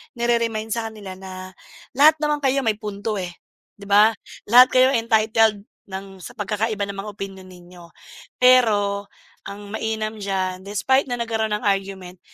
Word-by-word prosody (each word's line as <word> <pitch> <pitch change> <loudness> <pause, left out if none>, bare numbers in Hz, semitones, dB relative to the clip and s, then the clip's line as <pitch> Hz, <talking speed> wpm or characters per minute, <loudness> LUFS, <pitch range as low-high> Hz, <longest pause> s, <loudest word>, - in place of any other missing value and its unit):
nire-remind 230 -2 -1
sa 230 0 -2
kanila 200 -4 -9
na, 185 0 -9 0.4
"Lahat 300 +4 +6
naman 300 -1 0
kayo 270 0 +2
may 220 -3 +1
punto, 210 0 -4
eh, 180 -1 -5 0.4
di 200 - -15
ba, 205 +2 +6 0.4
lahat 245 +4 +8
kayo 255 0 +5
entitled 220 -2 +2 0.2
ng 195 0 -8
sa - - -11
pagkakaiba 210 +1 -2
ng 200 -1 -7
mga 205 +2 -5
opinyon 195 -1 -8
ninyo. 180 -1 -15 0.6
Pero 210 -6 +3 0.4
ang 200 0 -9
mainam 220 0 -3
diyan, 190 -2 -2
despite 210 +8 +1
na 245 - -2
nagkaroon 220 -2 -1
ng 210 - -6
argument 190 -2 -3
210 Hz, 150 wpm, -22 LUFS, 195-230 Hz, 0.6 s, lahat